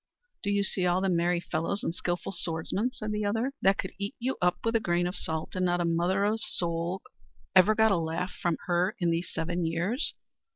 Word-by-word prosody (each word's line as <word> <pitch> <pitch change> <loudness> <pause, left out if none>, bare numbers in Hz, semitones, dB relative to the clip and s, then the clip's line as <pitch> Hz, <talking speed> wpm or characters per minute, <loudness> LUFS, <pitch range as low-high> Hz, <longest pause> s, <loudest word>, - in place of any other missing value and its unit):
"Do 205 - -2
you 200 0 +2
see 185 -2 0
all 175 +1 +3
them 190 -2 +1
merry 175 +1 +2
fellows 170 +4 -2
and - - -1
skilful 175 0 -2
swordsmen," 175 +6 -1
said 215 -3 -4
the 210 0 -1
other, 225 +6 0
"that 195 +1 +4
could 190 - -3
eat 200 +7 -3
you 255 +2 -1
up 180 0 +3
with 230 0 +1
a - - +5
grain 175 -3 +1
of 180 +2 -2
salt, 160 -2 -3
and 185 - 0
not 175 -1 +2
a 175 - +1
mother's 190 +6 +1
soul 170 +2 -1
of - - -19
'em - - -50 0.4
ever 215 +4 +2
got 220 0 +5
a 195 - +4
laugh 165 +2 -2
from 175 -2 -1
her 180 +4 +1
these 170 -1 0
seven 170 +2 -1
years?" 170 - -1
180 Hz, 220 wpm, -29 LUFS, 170-205 Hz, 0.4 s, a